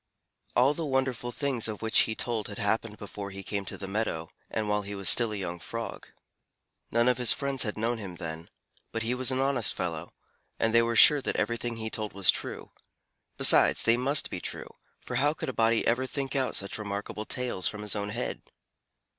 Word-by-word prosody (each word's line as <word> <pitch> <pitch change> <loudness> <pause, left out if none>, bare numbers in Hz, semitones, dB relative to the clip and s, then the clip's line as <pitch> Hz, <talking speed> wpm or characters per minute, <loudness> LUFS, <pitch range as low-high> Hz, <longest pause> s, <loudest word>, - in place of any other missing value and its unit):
All 130 +4 +4
the 165 - -4
wonderful 130 -4 -1
things 135 -4 -1
of 110 0 -6
which 110 - +4
he 110 - -2
told 115 -3 -2
had 100 - -7
happened 110 +1 -1
before 100 -1 -7
he 95 0 -8
came 100 -1 -4
to - - -4
the 95 - -7
meadow, 95 -6 -3 0.2
and 110 -1 -2
while 105 0 +1
he 100 0 -6
was 100 -1 +3
still 115 -2 +4
a - - -3
young 90 -3 -5
Frog. 115 +5 -6 0.8
None 120 +1 +2
of 125 -1 +2
his 125 -3 +4
friends 140 -2 -1
had 105 -3 -1
known 115 +2 -1
him 95 -4 -7
then, 80 -1 -7 0.4
but 115 - -3
he 115 +2 0
was 130 0 0
an 130 - +1
honest 135 -4 +2
fellow, 85 -2 -4 0.5
and 115 0 0
they 115 - +6
were 115 0 0
sure 145 +5 +7
that - - -3
everything 120 0 -1
he 110 -1 -5
told 110 -1 -3
was 100 -2 +5
true: - - -6 0.7
besides, - - +6
they 115 - +5
must 135 +4 +1
be - - -4
true, - - -5 0.2
for - - -4
how 145 +2 +3
could - - -5
a - - -4
body 115 0 +2
ever 130 +3 +1
think 135 +1 -4
out 130 -2 0
such 100 +2 -2
remarkable 105 +1 -4
tales 125 -8 -1
from 105 0 -4
his 105 - -2
own 100 0 -3
head? 120 +4 -4
115 Hz, 215 wpm, -28 LUFS, 100-125 Hz, 0.8 s, sure